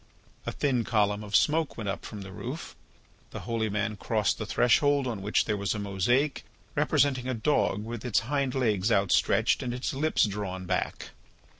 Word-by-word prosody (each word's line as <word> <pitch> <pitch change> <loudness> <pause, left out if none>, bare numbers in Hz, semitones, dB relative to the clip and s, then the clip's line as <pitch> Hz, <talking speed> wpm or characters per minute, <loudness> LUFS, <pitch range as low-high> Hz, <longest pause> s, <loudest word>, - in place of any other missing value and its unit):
A - - 0
thin 130 -5 0
column 105 -2 +1
of 105 0 -3
smoke 155 0 +2
went 110 -3 -4
up 100 - -3
from 105 - -7
the 95 - -9
roof. - - -7 0.5
The - - -7
holy 115 -2 -1
man 105 +1 -2
crossed 105 0 0
the 110 - -4
threshold 140 +5 +3
on 115 -6 -3
which 105 +2 +1
there 105 - 0
was 100 0 -1
a - - -2
mosaic 105 +8 0 0.3
representing 130 -3 +2
a 130 - -1
dog 110 -4 +1
with 115 0 -6
its 125 -4 +1
hind 135 +1 -1
legs 110 -5 +1
outstretched 100 -3 +3
and 125 -1 -3
its 125 - -3
lips 155 0 +2
drawn 95 -3 -4
back. - - -2
110 Hz, 180 wpm, -28 LUFS, 105-130 Hz, 0.5 s, threshold